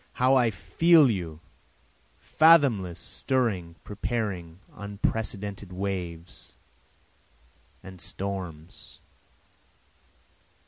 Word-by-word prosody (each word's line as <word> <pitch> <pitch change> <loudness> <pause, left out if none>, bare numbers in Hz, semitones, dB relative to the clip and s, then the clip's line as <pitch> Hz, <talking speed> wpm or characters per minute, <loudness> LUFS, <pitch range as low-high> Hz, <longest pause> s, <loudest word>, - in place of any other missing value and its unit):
how 130 +1 +3
I 125 -3 +4
feel 155 - +4
you, 85 -6 -5 0.8
fathomless, 135 - +4
stirring, 100 -6 -2
preparing 100 -6 -4 0.2
unprecedented 100 -1 -4
waves 90 -3 -6 1.3
and 95 -2 -10
storms. 90 -4 -7
100 Hz, 60 wpm, -27 LUFS, 90-120 Hz, 1.3 s, I